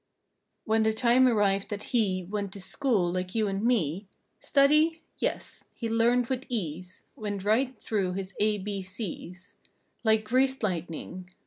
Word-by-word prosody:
When 220 0 +2
the 220 0 +2
time 245 +2 +4
arrived 200 -4 +2
that 205 +4 -6
he 190 -5 +2
Went 200 +1 -4
to 200 - -8
school 200 -3 0
like 185 +2 -3
you 220 -2 +2
and 195 +1 -2
me: 200 - +1 0.3
Study? 305 +3 +3 0.2
Yes. - - -3
He 230 - -3
learned 240 +2 +3
with 260 +1 -2
ease 180 -5 -4
Went 205 -3 -4
right 240 +4 +1
through 195 -4 0
his 195 0 -5
A, 210 0 +2
B, 200 0 -4
C's 185 -1 -7 0.5
Like 220 -1 +3
greased 260 +3 +2
lightning. 180 -1 -4
210 Hz, 150 wpm, -28 LUFS, 185-235 Hz, 0.5 s, time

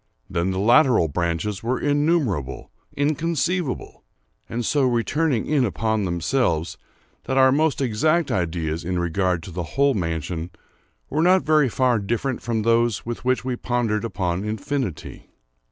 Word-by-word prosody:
Then 85 +2 -1
the 95 - -2
lateral 120 - +4
branches 85 +6 -2
were 120 +3 -1
innumerable—inconceivable—and 145 - -2
so 145 +4 +1
returning 130 +2 +1
in 145 -3 +2
upon 110 -1 0
themselves, 85 - 0 0.5
that 130 - -1
our 130 0 +6
most 150 +1 +1
exact 155 +7 +1
ideas 80 -2 -2
in 90 +1 -2
regard 85 0 0
to 95 - -9
the 90 +2 -4 0.2
whole 140 0 +4
mansion 85 - -3 0.6
were 155 - +1
not 185 +2 +4
very 155 -3 +3
far 125 -1 +2
different 120 +6 -2
from 115 -2 -1
those 115 -1 +2
with 120 0 -5
which 130 0 0
we 130 -1 -1
pondered 120 -3 -1
upon 95 -4 -2
infinity. 110 - -4
115 Hz, 135 wpm, -23 LUFS, 90-140 Hz, 0.6 s, our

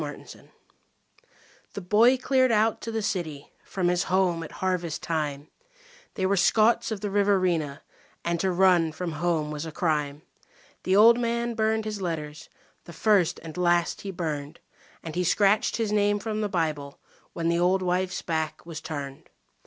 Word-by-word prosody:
9 - - -4
Autoplay - - -14 1.3
The 200 - -6
boy 220 +8 +4
cleared 260 0 +2
out 220 0 +2
to 230 - -5
the 225 -1 -2
city 160 -8 -4
from 185 -2 -2
his 175 0 +1
home 185 -2 +1
at 165 - -8
harvest 180 -4 -2
time 150 -2 -3 0.7
They 190 - -1
were 195 +1 +2
Scots 220 +5 +3
of 210 -3 -4
the 205 - -3
Riverina, 185 -8 +1 0.4
and 170 0 0
to 190 +2 +1
run 175 -3 +3
from 175 +1 -4
home 155 -1 -1
was 150 0 -4
a 160 - -6
crime. 150 -2 -1 0.6
The 185 - +2
old 230 +4 +7
man 235 0 -1
burned 220 -1 0
his 210 -2 -4
letters, 155 -3 -5 0.4
the 170 - -11
first 180 -1 +2
and 160 -2 -9
last 175 -1 +1
he 200 - -6
burned, 155 -4 -4 0.4
And 160 - -6
he 180 - 0
scratched 200 +4 +2
his 225 -2 -1
name 205 0 +2
from 215 +1 -3
the 210 - -1
Bible 155 -6 -2 0.4
when 165 -1 -2
the 170 0 +1
old 185 +2 +2
wife's 185 +1 -1
back 160 -3 -3
was 165 -2 -7
turned. 140 -3 -7
180 Hz, 170 wpm, -26 LUFS, 160-205 Hz, 1.3 s, old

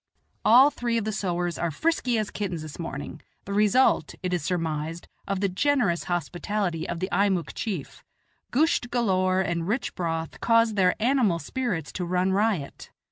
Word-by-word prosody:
All 260 +6 +7
three 235 -3 -1
of 225 - -1
the 215 - -1
sowars 175 -4 -2
are 170 - +1
frisky 250 - 0
as 215 -2 -2
kittens 180 -6 -3
this 155 +1 -9
morning, 155 -1 -6 0.2
the 200 - -4
result, 210 - +3
it 180 -1 -1
is 175 - 0
surmised, 165 -1 -2 0.2
of 195 -1 -1
the 200 - +3
generous 200 -3 +1
hospitality 175 +1 -2
of 170 - -3
the 185 +2 -2
Eimuek 190 -2 +1
chief 185 -11 -5 0.5
gusht 275 -3 +2
galore 185 -6 +2
and 170 -2 -2
rich 235 +6 -1
broth 165 -2 -3
cause 230 -1 +4
their 185 -3 +3
animal 235 -6 +2
spirits 170 - -3
to 180 - -4
run 180 +2 +1
riot. 200 -8 -1
185 Hz, 165 wpm, -26 LUFS, 170-225 Hz, 0.5 s, All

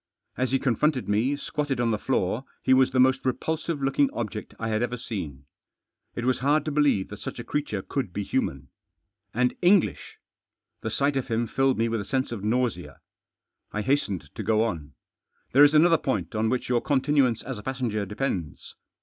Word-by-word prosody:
As 130 0 -1
he 135 - +4
confronted 130 +2 +1
me, 110 +7 +1
squatted 145 -2 -3
on 120 -1 +2
the 105 - 0
floor, 115 -1 0 0.2
he 130 - +4
was 130 0 +5
the 130 - 0
most 130 +1 +4
repulsive 155 +3 -2
looking 135 +1 +2
object 105 -2 -5
I 115 - -3
had 110 0 0
ever 120 0 -1
seen. 75 - -6 0.7
It 120 - -3
was 130 0 +1
hard 145 +3 +2
to 155 - -2
believe 145 -10 +2
that - - -8
such - - -6
a - - -5
creature 125 -10 -2
could 130 -10 -3
be 100 +3 -3
human. 70 - -2 0.6
And 125 +2 +1
English! 180 +1 +2 0.6
The 110 - -3
sight 140 +6 +1
of 135 - -2
him 115 -1 0
filled 135 +3 +1
me 115 +1 +2
with 115 -2 -1
a - - -7
sense 130 +3 -1
of 110 -4 -5
nausea. 120 +2 -1 0.7
I 105 - -2
hastened 100 - -1
to - - -5
go 110 0 +2
on. 80 -10 -4 0.3
" - - -45
There 140 +3 +7
is 145 +1 +6
another 165 +1 +6
point 100 -11 -2
on 110 +1 +1
which 125 +1 -1
your 120 -1 +2
continuance 135 -4 +2
as 125 -5 -5
a - - -8
passenger 120 -4 -2
depends. 100 - -4
125 Hz, 195 wpm, -26 LUFS, 110-135 Hz, 0.7 s, There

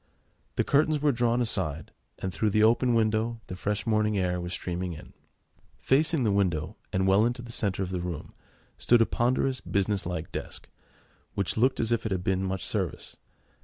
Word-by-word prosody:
The - - +2
curtains 150 +1 +2
were 145 0 +3
drawn 120 -1 +1
aside, 90 -9 -2 0.3
and 95 -1 -4
through 105 +6 +1
the 110 +1 +3
open 120 +2 +4
window 110 +1 +1
the 90 - -7
fresh 100 +1 -2
morning 110 -1 +2
air 90 -1 0
was 90 0 -5
streaming 90 -1 -3
in. 75 - -12 0.6
Facing 140 - +2
the 110 - +2
window, 90 -6 0 0.2
and 95 0 +1
well 95 +2 +5
into 120 +1 -1
the 120 - -9
centre 100 -4 -1
of 95 - -5
the 90 -2 -2
room, 85 -3 -5 0.5
stood 120 -1 +5
a - - 0
ponderous 130 +3 0
business 100 -2 -1
like 90 +1 -4
desk, - - -6 0.7
which 100 -2 0
looked 130 +4 +2
as 115 0 0
if 115 -1 +1
it - - -5
had 90 -1 -2
seen 95 0 +1
much 95 0 -2
service. - - -3
105 Hz, 190 wpm, -28 LUFS, 90-120 Hz, 0.7 s, well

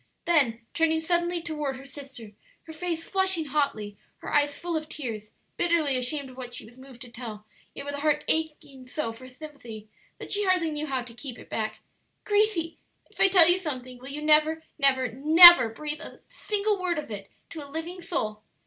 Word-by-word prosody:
Then 260 -9 +1
turning 325 -1 +1
suddenly 345 +1 -1
toward 300 -5 -3
her 265 +1 -11
sister, 270 -6 -11 0.3
her 320 - -11
face 335 0 -4
flushing 380 -4 +1
hotly, 265 -8 -2 0.2
her - - -8
eyes 290 -1 +2
full 345 0 -4
of 310 -1 -4
tears, 225 -9 -6 0.3
bitterly 335 -5 +1
ashamed 260 +2 -2
of 255 - -17
what 245 -2 -7
she - - -3
was 230 +2 -16
moved 260 -1 -13
to 245 - -13
tell, 225 -3 -9 0.3
yet - - -7
with 285 - -5
a 285 - -5
heart 300 0 +1
aching 300 -5 -3
so 255 -3 -3
for 255 +3 -12
sympathy 250 -6 -11 0.3
that - - -9
she 415 0 +1
hardly 365 -4 +1
knew 300 0 -4
how 260 -3 -2
to 240 -1 -12
keep 245 0 -8
it - - -14
back, 215 -1 -3 0.4
"Gracie, 410 -6 0 0.3
if - - -20
I - - +6
tell 360 -4 +6
you 350 +1 +4
something 255 -7 -6
will 260 +2 -10
you 295 +2 -6
never, 310 +1 +3 0.2
never, 260 -2 +3
never 310 +3 +9
breathe 300 +6 -6
a - - -12
single 415 -1 -2
word 355 -2 -1
of 300 -6 -6
it 200 -2 -7 0.2
to 315 -3 -7
a 285 - -12
living 330 +5 -6
soul?" 215 -10 -3
295 Hz, 200 wpm, -26 LUFS, 255-330 Hz, 0.4 s, never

